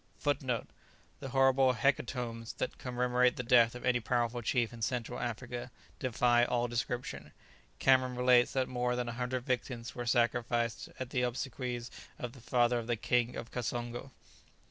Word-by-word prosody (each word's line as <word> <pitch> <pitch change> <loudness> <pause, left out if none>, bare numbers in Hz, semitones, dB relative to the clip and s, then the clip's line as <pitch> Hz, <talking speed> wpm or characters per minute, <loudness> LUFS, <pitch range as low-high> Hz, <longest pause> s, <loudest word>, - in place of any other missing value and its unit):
[Footnote 130 -5 0
1: - - -30 0.5
The 135 - -6
horrible 135 0 +4
hecatombs 120 -2 -1
that - - -4
commemorate 125 0 +2
the 125 - -3
death 120 -1 +5
of 125 - -7
any 125 -1 +3
powerful 120 +1 0
chief 120 0 0
in 115 - -10
Central 125 +1 -2
Africa 120 +1 -4 0.3
defy 120 -1 +3
all 120 0 +1
description. 120 +1 -3 0.5
Cameron 130 -1 +3
relates 125 -1 +5
that 130 -1 +1
more 125 -1 0
than 125 -1 -2
a - - -4
hundred 125 +1 -3
victims 120 -1 -2
were 120 -1 -5
sacrificed 120 -1 +1
at 130 -1 -5
the 125 - +1
obsequies 125 -1 -3 0.3
of 120 - -5
the 130 - -14
father 120 0 +2
of 115 - -6
the 120 - +1
King 120 +2 +1
of 115 - -6
Kassongo. 120 +1 -4
125 Hz, 165 wpm, -32 LUFS, 120-125 Hz, 0.5 s, death